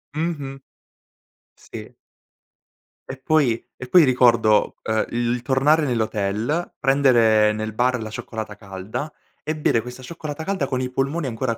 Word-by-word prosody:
Mh-mh. 145 -4 -3 1.0
Sì. - - -11 1.2
E 130 - -6
poi 130 -7 +2
e 130 - -9
poi, 175 +3 +7
ricordo, 120 -4 +3
uhm, 110 0 0
il 120 0 -1
il 125 - -3
tornare 145 +5 +2
nell'hotel, 110 - -1
prendere 120 -6 +4
nel 110 0 -4
bar 125 +1 +1
la 110 - -5
cioccolata 110 -1 -6
calda, 100 +11 -6 0.3
e 155 0 -3
bere 120 -6 +2
questa 125 +2 -10
cioccolata 155 +2 -7
calda 190 -7 -1
con 130 -1 -2
i 130 0 -2
polmoni 135 +4 -1
ancora 115 -1 -2
125 Hz, 140 wpm, -22 LUFS, 110-145 Hz, 1.2 s, poi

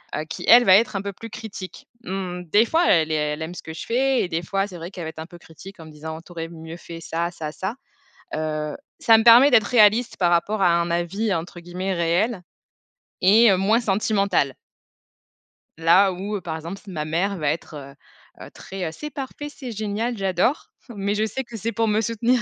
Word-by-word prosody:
heu, 155 - -2
qui - - -7
elle 245 +1 +8
va 190 - +8
être 225 0 0
un 195 - -1
peu 200 0 -4
plus 230 +5 -10
critique. 210 -4 -9 0.2
Mmh, 185 -3 -4
des 205 +7 +3
fois, 330 +8 +2
elle 160 -2 +3
ai - - +1
elle 150 0 -1
aime 165 +3 -5
ce - - -9
que 160 - -8
je 160 - -7
fais 260 +2 +1
et - - -2
des 165 -1 -2
fois 195 +3 -1
c'est 185 -3 -10
vrai 170 +2 -8
qu'elle 180 -3 -7
va - - -4
être 160 - -11
un 160 - -5
peu 175 0 -14
critique 185 +4 -14
en 160 - -10
me 155 - -12
disant: 160 +1 -8
«Tu 175 - -18
aurais 165 -1 -5
mieux 165 0 -9
fait 170 -1 -10
ça, 170 +1 -3
ça, 160 -3 -6
ça», 190 +8 -4 0.6
heu, 155 -1 -3 0.2
ca 225 -1 +5
me 220 - 0
permet 240 +4 +8
d'être 235 -5 +5
réaliste 225 +1 +4
par 175 -2 +3
rapport 195 +5 +1
à 180 - +5
un 170 0 -2
avis, 190 +5 -1
entre 175 +1 -5
guillemets 180 +3 -4
«réel» 180 +5 0 0.8
et 215 +4 +6
heu, 190 - +3
moins 215 +5 +2
sentimental. 195 - +1 1.2
Là, 175 +4 +5
où, 195 +4 -4
heu, 200 - -4
par 165 -2 -5
exemple, 170 +5 -7
ma 165 -6 -4
mère 180 +6 -1
va 150 -4 0
être, 160 +1 -6
heu 140 -1 -10 0.5
heu, - - -12
très, 190 -1 -7
heu - - -5
«C'est 300 - -7
parfait, 285 +1 -6
c'est 265 -4 -8
génial, 220 +3 -2
j'adore!» 195 - 0 0.2
mais 200 +1 -1
je 215 +1 +1
sais 240 +5 -4
que 235 -2 -12
c'est 225 +2 -3
pour 225 +1 0
me 215 +1 +2
soutenir 230 +3 +1
190 Hz, 230 wpm, -23 LUFS, 165-220 Hz, 1.2 s, elle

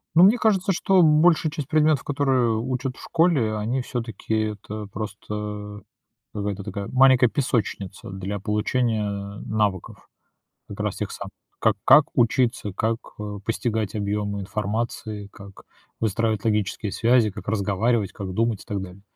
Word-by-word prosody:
Ну, 170 - +8
мне 205 +6 +7
кажется, 200 -4 +2
что 190 +1 +3
большая 155 0 +4
часть 150 -3 -5
предметов, 155 -2 +3
которые 135 -5 +1
учат 130 +1 -3
в - - -12
школе, 160 -10 +2
они 115 +5 -1
всё-таки, 115 -3 -4 0.2
это 105 0 -7
просто, 105 +1 -6
э, 105 -1 -5 0.5
какая-то 100 -1 -3
такая 100 0 -5
маленькая 130 -2 +6
песочница 110 - -2
для 95 +1 -4
получения 105 +1 0 0.4
навыков, 105 -4 -2 0.6
как - - -9
раз - - -1
тех - - -3
самых. - - -7 0.3
Как - - +3
как 150 +2 +8
учиться, 120 -3 +2
как, 115 +2 0 0.2
э, 105 -1 -5
постигать 110 -2 -1
объемы 100 -1 -2
информации, 105 +1 -3
как 100 -3 -13 0.4
выстраивать 110 -1 0
логические 105 -2 -1
связи, 115 -2 +3
как 100 -1 -10
разговаривать, 105 +1 +1
как 95 -2 -6
думать 115 -1 0
и - - -17
так 100 -2 -3
далее. 95 +1 -10
110 Hz, 145 wpm, -24 LUFS, 105-130 Hz, 0.6 s, Ну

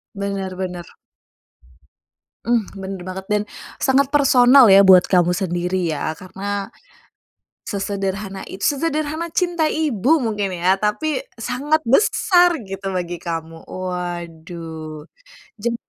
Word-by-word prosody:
Bener 195 -2 -4
bener. 180 -2 -5 1.6
Hmm, 235 -3 +2
bener 195 -1 -7
banget 190 +1 -6
dan 210 0 +2 0.4
sangat 270 0 +2
personal 270 -2 +6
ya 195 -1 +8
buat 185 -2 +7
kamu 180 -2 +3
sendiri 180 -2 -1
ya, 155 +1 -3
karena, 195 +2 -5 1.0
sesederhana 195 -1 -3
it 195 - -6
sesederhana 310 +2 -1
cinta 340 -3 0
ibu 305 - +1
mungkin 210 -5 -2
ya, 185 +2 +3
tapi 260 +6 0 0.2
sangat 270 +7 0
besar 355 - +4
gitu 195 0 -5
bagi 175 -2 -4
kamu, 165 -1 -5
waduh. 170 -3 -6 0.5
Jem 235 +3 -1
195 Hz, 110 wpm, -20 LUFS, 180-260 Hz, 1.6 s, ya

